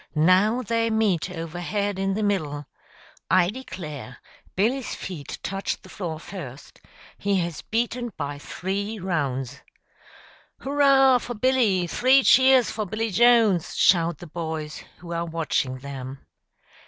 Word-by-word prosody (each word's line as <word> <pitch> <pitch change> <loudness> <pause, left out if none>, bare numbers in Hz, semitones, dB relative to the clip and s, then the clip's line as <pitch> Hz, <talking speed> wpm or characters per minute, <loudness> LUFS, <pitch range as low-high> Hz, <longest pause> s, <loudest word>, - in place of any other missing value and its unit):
Now 190 +10 +3
they 230 0 0
meet 215 -6 +1
overhead 180 +4 -3
in 195 0 0
the 215 - -1
middle. 150 -8 -1 0.6
I 185 0 +4
declare, 155 - -8 0.4
Billy's 240 +7 0
feet 160 -7 -7
touch 195 +2 -3
the - - -16
floor 165 -5 -5
first: 145 -7 -10 0.4
he 200 0 0
has 170 -3 -4
beaten 240 +1 -2
by 145 0 -4
three 200 +7 -4
rounds. 140 - -3 1.0
"Hurrah 270 -2 +4
for 245 0 -6
Billy! 220 -6 +2
three 260 +9 +4
cheers 260 -1 +5
for 215 -2 -3
Billy 220 +3 -2
Jones!" 225 -5 +4
shout 170 -3 +4
the 175 - -10
boys 160 -2 -5
who 170 0 -8
are 170 0 -2
watching 155 -5 -1
them. 135 0 -8
190 Hz, 130 wpm, -24 LUFS, 160-225 Hz, 1.0 s, cheers